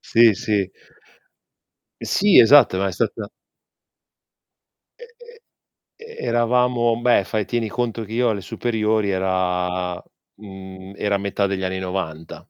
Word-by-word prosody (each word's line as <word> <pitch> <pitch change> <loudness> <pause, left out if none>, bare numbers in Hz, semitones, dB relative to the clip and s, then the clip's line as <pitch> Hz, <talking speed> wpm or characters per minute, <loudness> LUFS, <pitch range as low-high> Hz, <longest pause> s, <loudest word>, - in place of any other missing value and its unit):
Sì, 115 -2 +4
sì. 105 -3 -2 1.3
Sì, 205 -1 +4
esatto, 120 -5 +6
ma 100 - 0
è 95 - -3
stata 85 - -3 1.7
E 485 - -12 0.2
e 475 0 -17 0.6
e 460 0 -12
eravamo 120 -1 +1
beh, 120 -5 +3
fai 105 0 -3
tieni 115 0 -2
conto 115 -1 -3
che 110 - -12
io 120 0 +1
alle 100 -3 -2
superiori 110 -3 -1
era 90 -1 -2 0.4
mhmm, 95 -1 -11
era 100 -1 0
metà 100 0 -1
degli 95 -1 -3
anni 95 0 -3
'90. 90 -4 -5
105 Hz, 125 wpm, -21 LUFS, 95-120 Hz, 1.7 s, esatto